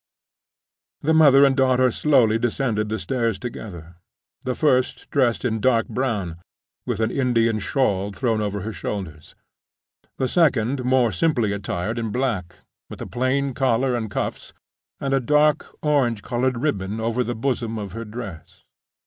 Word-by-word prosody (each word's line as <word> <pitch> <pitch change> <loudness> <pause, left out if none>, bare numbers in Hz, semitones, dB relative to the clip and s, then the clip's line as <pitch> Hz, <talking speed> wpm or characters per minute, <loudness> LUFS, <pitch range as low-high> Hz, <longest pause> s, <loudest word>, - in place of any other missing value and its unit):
The 160 +2 +2
mother 140 -3 +7
and 135 -1 +3
daughter 130 -1 +3
slowly 120 -6 +3
descended 115 -3 -1
the 110 - -1
stairs 115 -4 -1
together—the 95 +2 -8
first 130 -5 +1
dressed 125 -4 +1
in 110 -2 0
dark 115 -1 +2
brown, 105 -10 -2 0.5
with - - -2
an 110 +1 +1
Indian 115 -5 +1
shawl 105 -5 0
thrown 115 0 -1
over 100 -1 -2
her 110 +3 -5
shoulders; 85 -8 -6 0.8
the 130 - 0
second 135 -5 +2
more 125 -2 +3
simply 115 - +1
attired 100 +3 -3
in 115 -1 -2
black, 105 -7 -2 0.3
with - - -9
a - - -5
plain 130 +2 0
collar 130 0 +1
and 110 -2 -3
cuffs, - - -4 0.4
and 135 -1 -1
a 135 - +3
dark 150 +3 +2 0.2
orange 130 -8 +1
colored 125 +1 0
ribbon 105 -6 -2
over 115 +2 0
the 120 +1 -3
bosom 115 -2 -2
of 100 -2 -5
her 115 +1 -6
dress. 105 -7 -9
120 Hz, 150 wpm, -23 LUFS, 105-130 Hz, 0.8 s, mother